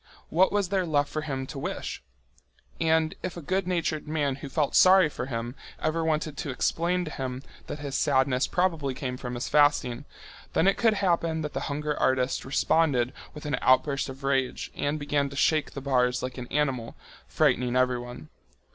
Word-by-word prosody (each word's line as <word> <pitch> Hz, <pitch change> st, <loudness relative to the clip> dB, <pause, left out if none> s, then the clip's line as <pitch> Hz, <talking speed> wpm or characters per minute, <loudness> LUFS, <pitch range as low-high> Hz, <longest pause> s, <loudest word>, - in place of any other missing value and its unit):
What 185 Hz, +4 st, +4 dB
was 205 Hz, -3 st, 0 dB
there 190 Hz, -2 st, 0 dB
left 145 Hz, -2 st, +1 dB
for 155 Hz, -, -3 dB
him 135 Hz, -3 st, -3 dB
to 135 Hz, +1 st, -7 dB
wish -, -, -4 dB, 0.8 s
for? -, -, 0 dB
And 160 Hz, 0 st, +3 dB
if 180 Hz, -1 st, -5 dB
a -, -, -4 dB
good 185 Hz, +4 st, -1 dB
natured 165 Hz, -4 st, -1 dB
man 145 Hz, -3 st, -1 dB
who 140 Hz, 0 st, -8 dB
felt 145 Hz, 0 st, 0 dB
sorry 185 Hz, -3 st, +7 dB
for 135 Hz, -, -5 dB
him 120 Hz, -1 st, -4 dB, 0.3 s
ever 160 Hz, +1 st, 0 dB
wanted 155 Hz, -1 st, -1 dB
to -, -, -4 dB
explain 175 Hz, +7 st, 0 dB
to 155 Hz, -, -6 dB
him 130 Hz, -2 st, -5 dB, 0.2 s
that -, -, -5 dB
his 145 Hz, -2 st, -6 dB
sadness 130 Hz, 0 st, +2 dB
probably 165 Hz, -7 st, 0 dB
came 125 Hz, -1 st, -4 dB
from 125 Hz, -1 st, -6 dB
his 120 Hz, -, -3 dB
fasting, 145 Hz, -5 st, +2 dB, 0.5 s
then 175 Hz, -, +3 dB
it 195 Hz, -, +4 dB
could 225 Hz, -2 st, +3 dB
happen 170 Hz, -4 st, +1 dB
that 150 Hz, -, -4 dB
the -, -, -2 dB
hunger 150 Hz, +1 st, -2 dB
artist 130 Hz, 0 st, +1 dB
responded 135 Hz, -2 st, +2 dB, 0.2 s
with 150 Hz, -, -9 dB
an 145 Hz, -4 st, -1 dB
outburst 140 Hz, +2 st, +3 dB
of 135 Hz, +1 st, -9 dB
rage 135 Hz, -2 st, -1 dB
and 145 Hz, +2 st, -1 dB
began 145 Hz, -1 st, 0 dB
to 140 Hz, -, -10 dB
shake 155 Hz, +2 st, +2 dB
the 140 Hz, -, -4 dB
bars 125 Hz, -2 st, +1 dB
like 130 Hz, 0 st, -4 dB
an 120 Hz, -, -6 dB
animal, 130 Hz, -6 st, -1 dB, 0.3 s
frightening 125 Hz, +1 st, +1 dB
everyone. 120 Hz, -8 st, -1 dB
145 Hz, 190 wpm, -27 LUFS, 130-160 Hz, 0.8 s, sorry